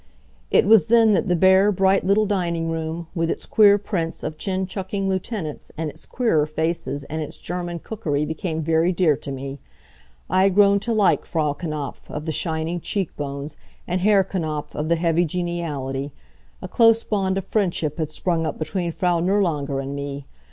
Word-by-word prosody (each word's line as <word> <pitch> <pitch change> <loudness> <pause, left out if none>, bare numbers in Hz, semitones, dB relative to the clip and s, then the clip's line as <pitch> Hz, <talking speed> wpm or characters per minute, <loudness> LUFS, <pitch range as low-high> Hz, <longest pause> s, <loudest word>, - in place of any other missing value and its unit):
It - - +4
was 220 +1 +6
then 225 -1 +5
that 205 - +1
the 180 - +2
bare, 190 +3 +5
bright 195 0 +2
little 200 +3 +3
dining 170 -5 -1
room, 165 +1 -3
with 165 -2 -1
its - - -3
queer 205 -2 +6
prints 180 -5 -3
of 155 - -4
chin 190 -1 -1
chucking 195 +1 -3
lieutenants, 190 -4 -4
and 160 -1 -2
its - - -13
queerer 165 -12 +1
faces, 155 -2 -2
and 155 +3 -5
its 150 - -5
German 175 0 -4
cookery 155 -7 -2
became 160 +1 -3
very 165 +3 +2
dear 170 -5 +3
to 140 - -7
me. 135 +1 -6 0.7
I 185 - +2
had 195 -1 +3
grown 200 -1 +5
to 235 +4 -3
like 215 -3 +3
Frau 155 -3 -1
Knapf, 150 -3 -6
of 150 +1 -5
the 160 - -1
shining 160 +2 -2
cheek 195 -1 -2
bones, 140 +1 -5 0.3
and 180 +1 -1
Herr 200 0 +4
Knapf, 160 -6 -4
of 150 +2 -3
the 170 - +4
heavy 170 0 +2
geniality. 150 -6 -3 0.5
A - - -4
close 230 -1 +4
bond 195 -2 0
of 195 - -3
friendship 175 -7 -1
had 155 -2 -1
sprung 165 +1 -1
up - - -4
between 170 +2 -2
Frau 175 0 +1
Nirlanger 165 -7 0
and 135 +1 -4
me. 140 0 -5
170 Hz, 185 wpm, -22 LUFS, 155-195 Hz, 0.7 s, was